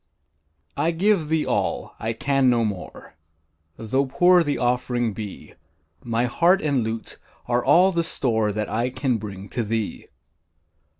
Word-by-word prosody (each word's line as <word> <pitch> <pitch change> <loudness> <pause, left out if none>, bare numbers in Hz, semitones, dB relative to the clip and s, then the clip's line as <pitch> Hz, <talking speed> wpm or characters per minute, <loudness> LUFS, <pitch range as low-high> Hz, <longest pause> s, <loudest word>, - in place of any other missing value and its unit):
I 165 - +1
give 170 -1 +1
thee 160 -1 +1
all - - -2
I 115 +1 -2
can 135 +2 +2
no 120 -2 +2
more 100 -6 -7 0.6
Tho' 130 +5 0
poor 175 +5 +4
the 145 -2 -1
offering 120 -2 0
be; 105 -2 -8 0.5
My 115 +1 0
heart 170 +10 +3
and 140 -7 0
lute 110 0 -5 0.3
are 120 0 +1
all 180 +7 +5
the 170 -2 0
store 110 -9 0
That 105 +1 -3
I 120 +3 -1
can 130 -1 -1
bring 100 -2 -8
to 120 - -2
thee. 110 0 -3
125 Hz, 145 wpm, -23 LUFS, 110-150 Hz, 0.6 s, all